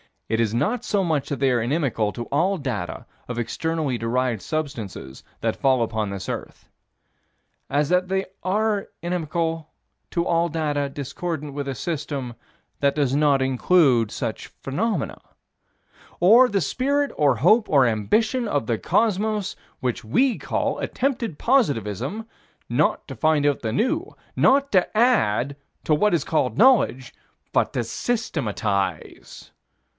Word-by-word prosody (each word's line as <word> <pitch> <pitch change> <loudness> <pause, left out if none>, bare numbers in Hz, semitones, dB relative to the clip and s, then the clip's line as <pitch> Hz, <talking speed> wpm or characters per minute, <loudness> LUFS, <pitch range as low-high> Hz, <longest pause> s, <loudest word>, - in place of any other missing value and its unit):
It 110 +1 0
is 110 -2 +1
not 215 - 0
so 200 -2 +1
much 155 -5 0
that 140 - -3
they 135 -1 +3
are 120 -2 +2
inimical 120 -5 0
to 120 - -5
all 185 +7 +1
data 105 - -4 0.2
of 125 - -5
externally 150 +3 -2
derived 120 -1 -1
substances 115 - -5 0.2
that - - -1
fall 130 -3 +3
upon 110 -2 -2
this 100 -1 -6
earth, - - -7 1.0
as 145 +1 +1
that 180 +1 +2
they 190 +1 0 0.2
are 205 +2 0 0.2
inimical 165 -2 -2 0.4
to 170 0 0
all 170 0 +2
data 150 -3 -1
discordant 145 +2 -5
with 140 0 -4
a 135 - -3
system 145 -6 -4 0.5
that 140 -1 +2
does 140 -4 +1
not 145 -2 +3
include 130 -3 +3
such - - -4
phenomena 185 +4 -3 1.0
Or 230 +8 +7
the 200 -4 0
spirit 280 - 0
or 145 -2 +3
hope 215 - +4
or 140 -4 +5
ambition 215 - +1
of 145 - 0
the 115 0 0
cosmos, 215 -2 0 0.3
which 125 -2 -2
we 245 - +2
call - - -1
attempted 245 - -2
positivism: 145 - 0 0.4
not 130 +7 +1
to 135 - -6
find 150 +4 +2
out 145 -1 +2
the 110 -2 -2
new; 320 - -1 0.2
not 275 +1 +3
to 190 +2 +2
add 140 - +2 0.3
to 155 - +2
what 210 +7 +3
is 165 - +2
called 130 -7 0
knowledge, 220 - +4 0.4
but - - +1
to 120 - 0
systematize. 110 - -3
150 Hz, 140 wpm, -23 LUFS, 125-195 Hz, 1.0 s, Or